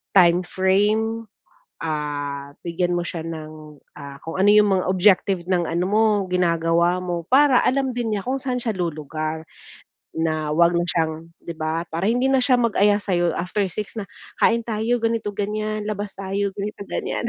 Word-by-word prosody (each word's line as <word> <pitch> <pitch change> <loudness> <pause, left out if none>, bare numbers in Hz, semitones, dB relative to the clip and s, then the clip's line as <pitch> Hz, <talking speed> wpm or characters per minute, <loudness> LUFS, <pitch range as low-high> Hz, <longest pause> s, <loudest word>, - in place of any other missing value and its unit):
time 175 -1 +6
frame. 215 +5 +1 0.6
Ah, 145 -2 -4
bigyan 175 +1 0
mo 175 - 0
siya 170 - -4
ng, 155 -2 -8 0.2
ah, 140 -1 -9
kung 165 +3 -5
ano 195 - +4
yung 210 0 +5
mga - - -3
objective 190 0 +3
ng 180 -2 +1
ano 170 +2 0
mo 215 +2 +3 0.3
ginagawa 170 0 +2
mo. 175 -2 -3
Para 270 -1 +6
alam 265 0 +1
din 235 -3 -1
niya 200 - -5
kung 265 +2 0
saan 255 -2 -2
siya 230 - -1
lulugar. 155 -2 -3 0.7
Na 155 -1 -1
huwag 170 +2 +4
na 170 0 +1
siyang 160 -1 -1
'di 170 - -6
ba, 160 +1 -2
para 170 +5 0
hindi 245 +3 +2
na 265 - +4
siya 255 0 +4
mag-aya 210 -3 +3
sa'yo 175 -5 0
after 185 +4 -1
6:00 210 +4 -5
na, 210 -3 -6 0.3
"Kain 230 0 +3
tayo, 225 +2 0
ganito-ganyan. 215 -1 -2
Labas 205 -1 -4
tayo, 195 +1 -2
ganito-ganyan." 205 +3 -4
185 Hz, 165 wpm, -22 LUFS, 165-215 Hz, 0.7 s, time